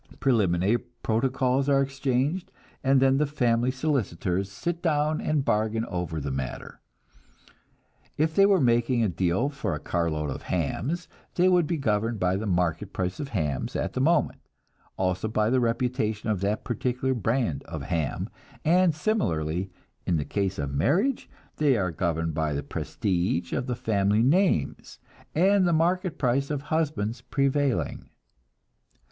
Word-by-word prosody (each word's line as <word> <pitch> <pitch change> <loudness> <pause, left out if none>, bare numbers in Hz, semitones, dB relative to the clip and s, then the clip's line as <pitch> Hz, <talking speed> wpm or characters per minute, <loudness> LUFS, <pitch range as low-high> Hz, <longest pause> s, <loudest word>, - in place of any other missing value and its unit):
Preliminary 105 -4 +2
protocols 130 +3 0
are 140 -1 +4
exchanged, 135 +4 -1 0.3
and 135 0 +4
then 135 0 +4
the 150 - +2
family 120 -4 +1
solicitors 100 - -1
sit 170 - -3
down 155 -2 +1
and 150 -3 0
bargain 110 +1 +1
over 90 -5 -3
the 70 -1 -3
matter. 65 -1 -5 1.4
If 155 +1 +1
they 195 +4 +5
were 195 -2 +4
making 120 -2 +2
a 110 - +2
deal 90 - 0
for 135 - -3
a - - -5
carload 80 -4 -1
of - - -6
hams, 125 - -2 0.3
they 180 +1 +4
would 180 -4 +4
be 170 - -1
governed 115 -3 0
by 90 0 +1
the 105 +3 -3
market 90 +1 0
price 90 +4 -2
of 145 - -3
hams 75 - -2
at - - -2
the 130 - -1
moment, 160 +2 +2 0.6
also 95 +2 0
by 110 +1 +1
the 130 - +3
reputation 115 -3 -1
of 100 -3 -2
that 105 +2 -1
particular 125 +2 -1
brand 115 - 0
of - - -6
ham; 80 -5 -2 0.4
and 175 0 +4
similarly, 90 - -1 0.4
in 85 - +2
the 75 - -2
case 95 -2 -1
of 70 -1 -3
marriage, 175 - +1 0.3
they 145 -5 +3
are 90 -4 0
governed 80 -1 -1
by 80 -1 -1
the 70 0 -2
prestige 85 +3 -2
of 125 - -1
the 125 - -1
family 105 -3 +1
names, 155 - +1 0.4
and 190 +3 +4
the - - +2
market 175 +2 +1
price 135 +1 +1
of 145 -2 -2
husbands 145 -8 -1
prevailing. 140 +1 0
120 Hz, 155 wpm, -26 LUFS, 90-145 Hz, 1.4 s, they